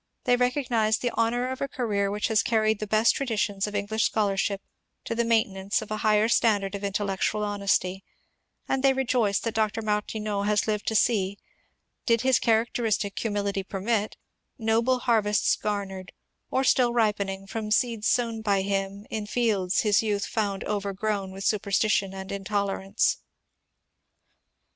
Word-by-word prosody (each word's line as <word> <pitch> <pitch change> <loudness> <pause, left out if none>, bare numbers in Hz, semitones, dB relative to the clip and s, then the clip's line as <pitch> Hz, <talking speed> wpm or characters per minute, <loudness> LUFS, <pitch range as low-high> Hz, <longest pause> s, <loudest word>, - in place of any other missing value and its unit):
They 245 - +3
recognize 245 -4 +1
the 245 - -2
honour 240 +2 0
of 260 - -6
a 275 - 0
career 210 -7 -1
which 210 +1 -1
has 220 -1 +3
carried 220 -2 +1
the 215 - -4
best 220 +3 +4
traditions 210 -6 -1
of 210 - -6
English 205 +2 0
scholarship 200 -2 0 0.4
to - - -2
the 235 +1 +1
maintenance 220 -4 +1
of 215 - -12
a 215 - -1
higher 215 0 +3
standard 210 -4 +2
of 200 0 -5
intellectual 200 +1 -1
honesty; 200 -2 0 0.6
and 270 - 0
they 270 0 +4
rejoice 240 -6 +1
that 230 - -3
Dr. 220 0 0
Martineau 210 -1 -2
has 210 0 +1
lived 210 -2 -2
to 220 - 0
see, 200 -3 +2 0.7
did 230 -2 +3
his 260 0 +3
characteristic 225 -3 0
humility 205 -2 -1
permit, 205 +3 -2 0.4
noble 230 +3 +1
harvests 215 -4 +2
garnered, 195 -3 -4 0.4
or 260 - +1
still 250 -2 +3
ripening, 200 -4 0
from 215 +1 -5
seeds 225 -1 +1
sown 230 -2 +1
by 200 -3 +1
him 195 +1 -2
in 215 -1 -3
fields 205 -6 +1
his 210 -2 +3
youth 205 -2 -1
found 200 -3 -2
overgrown 200 -1 -2
with 195 +1 -7
superstition 200 -1 +1
and 190 0 -7
intolerance." 200 0 0
210 Hz, 150 wpm, -26 LUFS, 200-225 Hz, 0.7 s, best